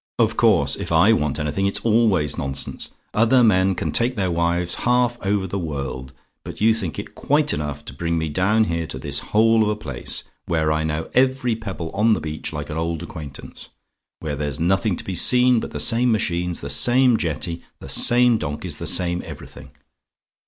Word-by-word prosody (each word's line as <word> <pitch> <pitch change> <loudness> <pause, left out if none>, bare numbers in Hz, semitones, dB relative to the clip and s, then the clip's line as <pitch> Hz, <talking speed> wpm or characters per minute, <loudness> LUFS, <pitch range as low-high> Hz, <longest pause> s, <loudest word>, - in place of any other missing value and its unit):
"Of - - +2
course; - - +3
if - - -6
I - - +5
want 75 -2 -1
anything 75 +5 -1
it's 100 - 0
always 105 - +2
nonsense. 70 0 -4 0.2
Other 115 +3 +4
men 95 -3 +3
can - - -3
take 120 +2 +1
their 95 -3 -1
wives 85 +1 0
half 120 0 +1
over 100 0 0
the 95 +2 -4
world; 70 -5 -5 0.3
but - - -9
you 110 +1 +4
think 95 -9 -4
it - - -7
quite 150 +1 +1
enough 75 -1 -4
to - - -9
bring 85 +4 -2
me 80 -1 -1
down 95 +8 +2
here 85 -5 -2
to 65 - -7
this 70 +1 -3
hole 115 +1 +4
of 105 - +2
a 105 - 0
place, 70 - -3 0.2
where 80 -2 +1
I 80 0 0
know 80 +1 -3
every 130 -2 +2
pebble 100 -7 -6
on 110 +2 +3
the - - 0
beach 75 0 -5
like 75 -1 -6
an 75 - -4
old 85 0 -2
acquaintance 75 -6 -9 0.5
where 75 -2 -3
there's 75 0 -4
nothing 95 +4 +1
to - - -7
be 95 - -5
seen 125 +5 +4
but - - -5
the - - -6
same 120 +1 +2
machines 90 -5 -1
the - - -6
same 125 0 +3
jetty 85 -2 -2 0.2
the - - -10
same 120 -1 +4
donkeys 75 -4 -4
the - - -5
same 85 -1 +1
everything. - - -11
90 Hz, 195 wpm, -22 LUFS, 75-110 Hz, 0.5 s, I